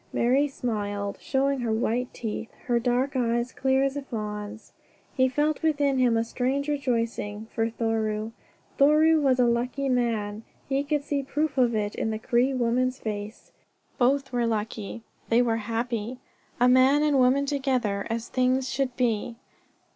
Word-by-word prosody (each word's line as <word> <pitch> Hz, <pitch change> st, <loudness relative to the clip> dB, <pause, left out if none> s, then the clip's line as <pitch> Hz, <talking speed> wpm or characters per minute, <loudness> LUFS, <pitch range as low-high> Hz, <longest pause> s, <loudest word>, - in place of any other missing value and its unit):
Marie 265 Hz, +5 st, +2 dB
smiled, 205 Hz, -6 st, -3 dB
showing 275 Hz, 0 st, 0 dB
her 235 Hz, -2 st, -1 dB
white 235 Hz, +3 st, 0 dB
teeth, 225 Hz, 0 st, -5 dB, 0.2 s
her 240 Hz, -1 st, +2 dB
dark 250 Hz, +3 st, 0 dB
eyes 240 Hz, 0 st, 0 dB
clear 265 Hz, 0 st, +2 dB
as 275 Hz, 0 st, 0 dB
a 285 Hz, -, -3 dB
fawn's. 210 Hz, -3 st, -6 dB, 0.4 s
He 260 Hz, -1 st, +3 dB
felt 295 Hz, +3 st, 0 dB
within 285 Hz, -4 st, +1 dB
him 245 Hz, -3 st, +3 dB
a 225 Hz, -, +2 dB
strange 260 Hz, +4 st, -1 dB
rejoicing 230 Hz, -7 st, -2 dB
for 225 Hz, 0 st, 0 dB
Thoreau. 220 Hz, -1 st, -1 dB, 0.5 s
Thoreau 310 Hz, +3 st, +5 dB
was 265 Hz, -3 st, +2 dB
a 250 Hz, -, +5 dB
lucky 245 Hz, +3 st, 0 dB
man. 225 Hz, -4 st, 0 dB, 0.3 s
He 275 Hz, 0 st, 0 dB
could 290 Hz, 0 st, -1 dB
see 285 Hz, -1 st, -1 dB
proof 295 Hz, +2 st, -2 dB
of 245 Hz, -3 st, +3 dB
it 205 Hz, -1 st, -1 dB
in -, -, -2 dB
the 220 Hz, -, -2 dB
Cree 245 Hz, +3 st, +1 dB
woman's 255 Hz, 0 st, 0 dB
face. 210 Hz, -1 st, -6 dB, 0.5 s
Both 270 Hz, +2 st, +2 dB
were 240 Hz, -2 st, 0 dB
lucky. 220 Hz, 0 st, -3 dB, 0.3 s
They 235 Hz, +2 st, +4 dB
were 230 Hz, -2 st, +1 dB
happy 230 Hz, +1 st, -3 dB, 0.4 s
a 245 Hz, -, +5 dB
man 260 Hz, +4 st, +5 dB
and 295 Hz, -3 st, +3 dB
woman 260 Hz, +3 st, +4 dB
together, 255 Hz, -8 st, -1 dB
as 230 Hz, +1 st, -3 dB
things 255 Hz, +1 st, +1 dB
should 260 Hz, -2 st, -1 dB
be. 230 Hz, -2 st, 0 dB
245 Hz, 160 wpm, -26 LUFS, 225-270 Hz, 0.5 s, Thoreau